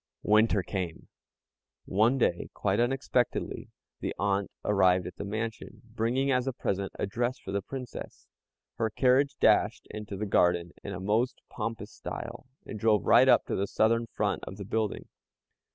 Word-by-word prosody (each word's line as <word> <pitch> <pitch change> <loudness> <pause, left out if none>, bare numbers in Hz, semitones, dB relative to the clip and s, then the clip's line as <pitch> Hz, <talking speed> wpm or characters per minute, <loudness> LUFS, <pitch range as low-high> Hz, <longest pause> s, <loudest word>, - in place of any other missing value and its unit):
Winter 105 -2 +4
came! 90 -5 -5 0.8
One 110 +7 +3
day, 85 -8 0
quite - - 0
unexpectedly, 125 0 0 0.3
the - - -3
aunt 100 0 0 0.2
arrived 95 -3 +3
at 90 - -8
the - - -4
mansion, 110 +5 -5
bringing 125 +5 +1
as 125 0 +1
a 135 - 0
present 100 -3 -2
a - - 0
dress 120 +5 -1
for - - -8
the 100 0 0
Princess. 125 +4 -8 0.5
Her 110 - +1
carriage 135 +4 +2
dashed - - +3
into 105 -2 -6
the 105 - -2
garden 85 -3 +2
in 100 - -5
a 95 - -5
most 110 +7 0
pompous 110 -1 -4
style, 130 - -7 0.2
and 105 - -7
drove 105 -3 +3
right - - +6
up - - +5
to - - -2
the 100 - -1
southern 115 +3 +2
front - - -1
of 95 - -8
the 100 - -6
building. 110 +1 -2
110 Hz, 165 wpm, -29 LUFS, 100-120 Hz, 0.8 s, right